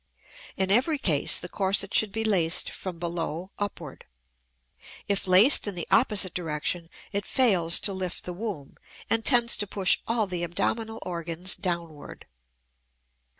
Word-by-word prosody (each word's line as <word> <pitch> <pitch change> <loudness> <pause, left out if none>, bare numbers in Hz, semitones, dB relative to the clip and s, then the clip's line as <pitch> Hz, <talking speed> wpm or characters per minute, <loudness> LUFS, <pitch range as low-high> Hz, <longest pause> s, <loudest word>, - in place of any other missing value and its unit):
In 190 0 0
every 265 +9 +3
case 160 - +1
the 180 - -7
corset 195 +1 -1
should 215 -2 +3
be 225 +2 -2
laced 180 -6 +1
from 185 -3 -7
below 170 +1 -4
upward; 175 -8 -6 1.0
if 200 -1 -1
laced 200 +8 +6
in 200 - -4
the 170 - -5
opposite 205 -7 +4
direction 165 0 -3 0.2
it 200 0 -2
fails 190 -10 +2
to 200 - -1
lift 185 -2 -4
the 180 - -5
womb 180 -8 -7 0.3
and 225 0 +2
tends 240 -2 +4
to 205 - -2
push 190 -1 +3
all 230 -1 +1
the 180 -3 -5
abdominal 220 +6 -2
organs 170 +1 -3
downward. 170 -5 -6
185 Hz, 145 wpm, -26 LUFS, 170-210 Hz, 1.0 s, laced